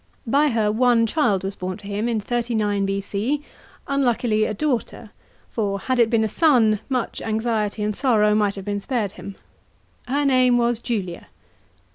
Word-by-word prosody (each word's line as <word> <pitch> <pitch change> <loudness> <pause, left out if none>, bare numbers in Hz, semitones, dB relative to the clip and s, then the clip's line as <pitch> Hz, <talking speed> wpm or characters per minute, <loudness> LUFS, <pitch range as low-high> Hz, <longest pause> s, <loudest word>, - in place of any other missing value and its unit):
By 280 +6 +3
her 220 -5 +1
one 235 0 +3
child 215 - +1
was 195 +1 -4
born 185 0 -5
to 205 - -15
him 205 +3 -2
in 225 -2 0
39 215 -3 -1
B.C., 205 +9 -2 0.4
unluckily 240 -5 +1
a 215 - -2
daughter; 240 -5 -2 0.4
fix, 200 -3 -2
had 255 -1 0
it 230 -2 +4
been 225 -1 +2
a - - +1
son, 230 -6 +3
much 255 -3 -2
anxiety 220 -1 -1
and 210 0 -1
sorrow 215 -5 +3
might 210 -1 +1
have 195 -1 -8
been 205 0 -2
spared 215 -2 -2
him. 200 - -9 0.7
Her 285 +3 0
name 255 -2 +4
was 240 -1 +1
Julia. 200 -8 -4
220 Hz, 165 wpm, -22 LUFS, 205-245 Hz, 0.7 s, it